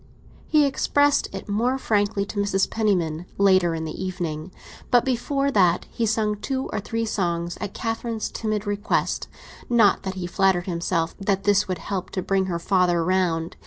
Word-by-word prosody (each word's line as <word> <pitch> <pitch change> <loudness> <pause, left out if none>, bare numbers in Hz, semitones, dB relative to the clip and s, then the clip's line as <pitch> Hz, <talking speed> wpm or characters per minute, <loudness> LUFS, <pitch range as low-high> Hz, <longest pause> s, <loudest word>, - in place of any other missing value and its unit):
He 300 -2 +4
expressed 285 +1 +2
it 195 - -7
more 235 +6 +1
frankly 205 -4 0
to 205 - -5
Mrs. 200 -1 +1
Penniman 180 -6 0
later 185 -4 +4
in 160 0 -4
the 160 +4 -5
evening. 175 -3 -4 0.4
But 245 -1 +4
before 275 +2 0
that 180 -7 +3
he 230 -2 -1
sang 215 -1 0
two 265 +5 -3
or 215 - 0
three 225 +3 -2
songs 175 -5 -1
at 205 -2 -5
Catherine's 225 -1 -3
timid 215 -2 -2
request; 205 +1 -1 0.4
not 225 -5 +4
that 190 0 -4
he 185 -1 -4
flattered 180 0 +2
himself 170 -2 -1
that 195 -1 0
this 205 0 +3
would 185 -1 -2
help 190 +1 -4
to 185 - 0
bring 190 -1 +1
her 175 -2 -1
father 175 -1 +2
round. 175 -3 0
195 Hz, 170 wpm, -24 LUFS, 180-220 Hz, 0.4 s, He